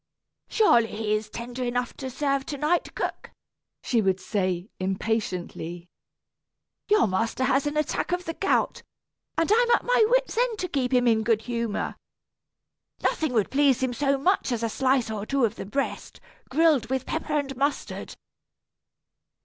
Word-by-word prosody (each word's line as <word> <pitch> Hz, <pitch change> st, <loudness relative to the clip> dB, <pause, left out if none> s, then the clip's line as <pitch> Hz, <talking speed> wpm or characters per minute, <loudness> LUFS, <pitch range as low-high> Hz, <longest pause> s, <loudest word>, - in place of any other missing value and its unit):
"Surely 240 Hz, -, +4 dB
he 215 Hz, -1 st, -2 dB
is 215 Hz, 0 st, -1 dB
tender 240 Hz, +3 st, -5 dB
enough 245 Hz, 0 st, -2 dB
to 265 Hz, -, -5 dB
serve 275 Hz, +1 st, 0 dB
to 285 Hz, -, -4 dB
night, 310 Hz, +5 st, 0 dB
cook," -, -, -4 dB, 0.5 s
she 235 Hz, -3 st, +2 dB
would 190 Hz, -2 st, +1 dB
say, 185 Hz, -2 st, -2 dB
impatiently. 185 Hz, -3 st, -3 dB, 1.0 s
"Your 420 Hz, -1 st, +5 dB
master 225 Hz, +6 st, -1 dB
has 275 Hz, +2 st, +2 dB
an 295 Hz, +1 st, -2 dB
attack 305 Hz, +3 st, -1 dB
of 355 Hz, 0 st, -1 dB
the 330 Hz, -, -3 dB
gout, 390 Hz, +3 st, 0 dB, 0.6 s
and 330 Hz, +4 st, +1 dB
I -, -, +7 dB
am 480 Hz, +1 st, +3 dB
at -, -, -3 dB
my -, -, +4 dB
wit's -, -, +2 dB
end 485 Hz, -3 st, +1 dB
to 365 Hz, -, -2 dB
keep 270 Hz, -6 st, -1 dB
him 250 Hz, -1 st, +3 dB
in 225 Hz, -2 st, +4 dB
good 220 Hz, 0 st, +1 dB
humor. 235 Hz, -3 st, -3 dB, 1.1 s
Nothing 315 Hz, -4 st, +1 dB
would 220 Hz, -4 st, +1 dB
please 270 Hz, -2 st, +3 dB
him 255 Hz, -1 st, 0 dB
so 275 Hz, +3 st, +1 dB
much 355 Hz, 0 st, +1 dB
as 235 Hz, -1 st, -1 dB
a 230 Hz, -, +1 dB
slice 255 Hz, -1 st, +1 dB
or 210 Hz, -2 st, -3 dB
two 275 Hz, -3 st, +2 dB
of 215 Hz, -, -1 dB
the 210 Hz, -, -8 dB
breast, 275 Hz, +6 st, -3 dB, 0.3 s
grilled 300 Hz, -5 st, +3 dB
with 265 Hz, -1 st, -1 dB
pepper 310 Hz, -1 st, -2 dB
and 275 Hz, -2 st, -2 dB
mustard." 280 Hz, +3 st, -2 dB
255 Hz, 165 wpm, -26 LUFS, 220-300 Hz, 1.1 s, I